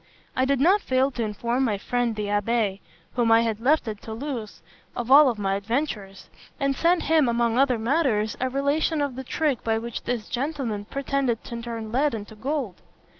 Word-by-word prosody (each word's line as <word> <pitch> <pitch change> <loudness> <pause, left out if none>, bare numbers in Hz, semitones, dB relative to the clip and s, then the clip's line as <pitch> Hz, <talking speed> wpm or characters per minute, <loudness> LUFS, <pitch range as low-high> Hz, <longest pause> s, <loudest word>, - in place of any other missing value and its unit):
I 260 - +2
did 275 -1 +1
not 375 +9 +4
fail 260 -2 +1
to 245 - -4
inform 235 +4 -1
my 215 -5 +1
friend 240 +2 -1
the 210 -1 -3
abbé, 205 0 0 0.3
whom 235 -2 +2
I 225 0 +6
had 225 -2 -1
left 275 +3 +2
at 210 -2 -5
Toulouse, 225 - -6 0.3
of 240 +1 -3
all 280 -1 +8
my 195 -2 -1
adventures; 205 -2 -3 0.3
and 275 -1 +1
sent 340 +3 +2
him, 310 -5 +3
among 235 0 +1
other 265 -3 +3
matters, 225 -4 +1
a 260 - 0
relation 285 +4 0
of 285 -3 -1
the 265 - -5
trick 280 -1 -1
by 225 -1 +1
which 235 0 -5
this 240 -3 -3
gentleman 250 -6 -3
pretended 275 -2 -1
to 235 0 -6
turn 230 -2 -6
lead 275 +1 +1
into 210 0 -7
gold. 250 - -3
240 Hz, 185 wpm, -25 LUFS, 220-275 Hz, 0.3 s, all